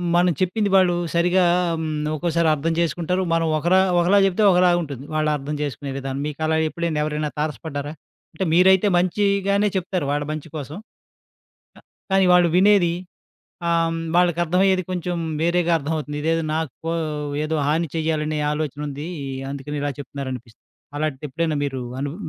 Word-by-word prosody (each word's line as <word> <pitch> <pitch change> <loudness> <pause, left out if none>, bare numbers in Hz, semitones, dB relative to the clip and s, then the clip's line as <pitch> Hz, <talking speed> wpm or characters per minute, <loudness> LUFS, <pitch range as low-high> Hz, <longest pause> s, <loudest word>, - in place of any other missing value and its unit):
మనం 175 +1 +4
చెప్పింది 200 +3 +1
వాళ్ళూ 185 -2 +4 0.2
సరిగా 180 +2 +3 0.3
ఆహ్, - - 0
హ్మ్. 155 -1 -2
ఒక్కోసారర్థం 165 -1 +1
చేసుకుంటారు. 170 +2 0
మనం 165 0 +1
ఒకరా 175 +4 +3 0.2
ఒకలా 180 +4 +4
చెప్తే 195 +3 +1
ఒకలాగుంటుంది 175 -7 +1
వాళ్ళర్థం 150 -1 -1
చేసుకునే 140 -1 -4
విధానం. 135 0 -4
మీకలా 155 +2 -1
ఎప్పుడైనా, 170 -2 -2
ఎవరైనా 150 0 -2
తారసపడ్డారా? 150 -1 -4 0.4
అంటే, 190 - -1
మీరైతే 190 +3 +5
మంచీగానే 200 +2 +1
చెప్తారు 180 -4 -2
వాళ్ళ 145 0 0
మంచి 155 0 -5
కోసం. 150 +2 -6 1.0
క - - -15 0.3
కానీ 195 0 +4
వాళ్ళు 175 -1 +5
వినేది 190 -2 +5 0.8
ఆహ్, 165 -1 +2
హ్మ్, 165 - -3 0.2
వాళ్ళకర్థమయ్యేది, 180 +2 +2
కొంచెం 180 -1 -2 0.2
వేరేగా 170 +1 +2
అర్థవవుతుంది. 150 -1 -3
ఇదేదో 165 +1 +1
నాకో 160 +1 -3 0.5
ఏదో 155 +1 -1
హాని 160 +3 +1
చెయ్యాలనే 155 -1 -1
ఆలోచనుందీ. 150 0 -4 0.4
అందుకని 140 +1 -5
ఇలా 145 0 -1
చెప్తున్నారనిపిస్తుంది. 130 -4 -7 0.3
అలాటిదెప్పుడైనా 155 +2 -2
మీరూ 135 -2 -3 0.2
అనుభ 145 +2 -3
160 Hz, 130 wpm, -22 LUFS, 150-175 Hz, 1.0 s, మీరైతే